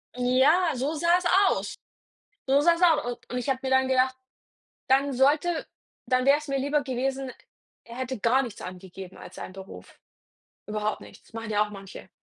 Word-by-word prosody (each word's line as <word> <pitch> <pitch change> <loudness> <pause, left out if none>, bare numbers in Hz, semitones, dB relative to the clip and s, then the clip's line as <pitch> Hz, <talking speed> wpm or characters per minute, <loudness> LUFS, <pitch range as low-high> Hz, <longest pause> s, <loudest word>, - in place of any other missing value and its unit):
Ja, 265 +8 +3
so 270 +5 -1
sah's 340 +3 +2 0.2
aus. - - -2 0.7
So 275 +2 +4
sah's 335 +2 +3
aus 320 -4 +5
und - - -20
und 250 - -2
ich 250 +2 -3
habe 265 -1 +1
mir 265 - -1
dann 260 0 +3
gedacht, 260 0 +2 0.7
dann 275 +2 +3
sollte 295 +6 +2 0.4
dann 255 -1 +2
wär's 290 +2 +3
mir 275 0 0
lieber 285 +2 0
gewesen, 265 0 -2 0.5
er 235 0 -11
hätte 260 -1 -4
gar 240 +5 +3
nichts 235 -6 -7
angegeben 185 0 -9
als - - -12
seinen - - -7
Beruf. 190 0 -12 0.7
Überhaupt 210 0 -2
nichts, - - -16
machen 225 -1 -6
ja 210 0 +3
auch - - -12
manche. 195 -2 -11
260 Hz, 170 wpm, -26 LUFS, 230-285 Hz, 0.7 s, aus